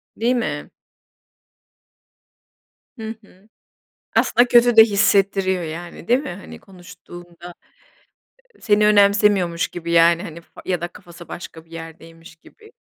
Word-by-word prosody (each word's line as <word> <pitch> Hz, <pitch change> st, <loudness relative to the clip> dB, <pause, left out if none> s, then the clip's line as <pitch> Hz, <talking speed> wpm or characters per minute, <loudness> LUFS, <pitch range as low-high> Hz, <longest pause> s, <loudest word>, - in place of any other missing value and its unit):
Değil 240 Hz, +3 st, 0 dB
mi? 240 Hz, -, -4 dB, 2.3 s
Hı 220 Hz, -2 st, -7 dB
hı. 200 Hz, +2 st, -23 dB, 0.7 s
Aslında 245 Hz, +1 st, +3 dB
kötü 240 Hz, 0 st, +4 dB
de 220 Hz, -, +11 dB
hissettiriyor 195 Hz, -3 st, +1 dB
yani, 170 Hz, +2 st, -8 dB
değil 245 Hz, +2 st, +3 dB
mi? 290 Hz, -, -7 dB
Hani 185 Hz, +3 st, -10 dB
konuştuğunda, 175 Hz, -2 st, -14 dB, 1.1 s
ııı, -, -, -26 dB
seni 210 Hz, -1 st, +2 dB
önemsemiyormuş 200 Hz, -4 st, +3 dB
gibi 170 Hz, -1 st, -6 dB
yani 170 Hz, +1 st, +4 dB
hani 165 Hz, +1 st, -9 dB
f 170 Hz, -, -29 dB
ya 180 Hz, -3 st, -2 dB
da 175 Hz, -, -4 dB
kafası 175 Hz, 0 st, -15 dB
başka 160 Hz, -2 st, -10 dB
bir 165 Hz, -, -29 dB
yerdeymiş 165 Hz, 0 st, -12 dB
gibi. 435 Hz, -, -20 dB
180 Hz, 125 wpm, -20 LUFS, 170-210 Hz, 2.3 s, de